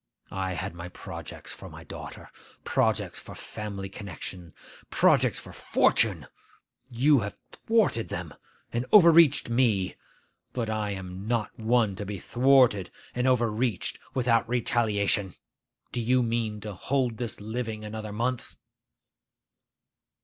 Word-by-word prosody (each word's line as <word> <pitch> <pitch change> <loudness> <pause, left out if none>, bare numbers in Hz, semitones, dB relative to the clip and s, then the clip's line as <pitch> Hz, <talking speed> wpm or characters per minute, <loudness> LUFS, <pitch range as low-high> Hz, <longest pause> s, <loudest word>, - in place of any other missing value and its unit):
I 95 -1 -2
had 85 - -4
my 85 +1 -8
projects - - -8
for - - -10
my - - -11
daughter; - - -9 0.3
projects - - 0
for - - -11
family 100 -2 -6
connection; 95 -3 -8 0.3
projects - - +4
for - - -9
fortune. - - +2 0.6
You 135 +4 +4
have 100 -2 -5 0.3
thwarted 215 - +2
them, 85 -4 -5 0.4
and 120 +2 -1
overreached 170 - +7
me; 115 -7 +2 0.6
but 115 -3 -2
I 110 -1 -1
am 95 0 -6
not 115 -2 0
one 110 -2 +2
to 105 - -4
be 105 -1 -4
thwarted 125 -4 +3 0.2
and 125 +1 0
overreached 120 -4 +1 0.2
without 115 -3 +2
retaliation. 105 -5 +1 0.6
Do - - -3
you 125 +2 +3
mean 115 -2 -1
to 105 0 -6
hold 125 +3 -1
this 120 -4 -3
living 110 0 -4
another 110 0 -6
month? 120 +4 -2
110 Hz, 125 wpm, -27 LUFS, 100-125 Hz, 0.6 s, overreached